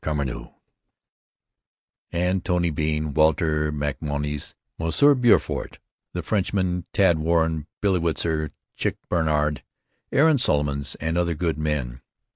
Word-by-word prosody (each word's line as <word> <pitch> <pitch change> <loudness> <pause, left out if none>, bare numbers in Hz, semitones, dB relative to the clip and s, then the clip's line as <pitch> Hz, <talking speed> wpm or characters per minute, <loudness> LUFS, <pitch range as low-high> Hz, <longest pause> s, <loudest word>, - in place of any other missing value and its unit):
Carmeau, 70 -5 -3 1.6
and 90 +1 0
Tony 90 -2 +1
Bean, 75 0 -1
Walter 75 0 +2
MacMonnies, 75 0 -3 0.2
M. 125 - +3
Beaufort 120 -3 +2 0.4
the - - -3
Frenchman, 95 -4 -1
Tad 90 -5 +3
Warren, 80 -1 +1
Billy 95 -3 +2
Witzer, 80 -2 0 0.3
Chick - - -1
Bannard, 75 -3 +1 0.5
Aaron 150 0 +4
Solomons 70 - +1
and 80 +2 -1
other 85 -1 0
good 80 -1 -1
men. 70 -5 -2
80 Hz, 105 wpm, -24 LUFS, 75-90 Hz, 1.6 s, Aaron